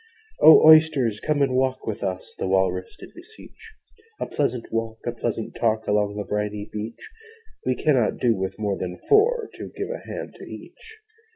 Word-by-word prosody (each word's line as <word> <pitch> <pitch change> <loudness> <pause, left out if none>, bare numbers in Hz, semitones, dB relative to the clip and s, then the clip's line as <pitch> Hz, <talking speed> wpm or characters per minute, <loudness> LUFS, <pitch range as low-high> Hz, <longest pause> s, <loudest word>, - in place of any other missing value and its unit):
'O 155 0 +8
Oysters, 155 -9 +5
come 145 +2 0
and 135 -2 0
walk 130 0 0
with 110 -3 -4
us! 95 -2 -4
The - - -2
Walrus 95 -1 0
did - - -13
beseech. 440 +4 -15 0.5
'A - - -2
pleasant 125 -5 -2
walk, 115 0 -2
a 120 - -1
pleasant 115 -1 -4
talk, 110 -2 0
Along 105 0 +1
the 105 - -3
briny 105 0 -3
beach: 110 - -7 0.6
We 130 - +2
cannot 130 -8 +1
do 120 -3 +2
with 95 0 -4
more 105 -2 -2
than 90 0 -5
four, 455 +2 +3
To - - -8
give - - -4
a - - -5
hand - - -6
to - - -12
each.' 445 -1 -12
115 Hz, 180 wpm, -23 LUFS, 105-150 Hz, 0.6 s, O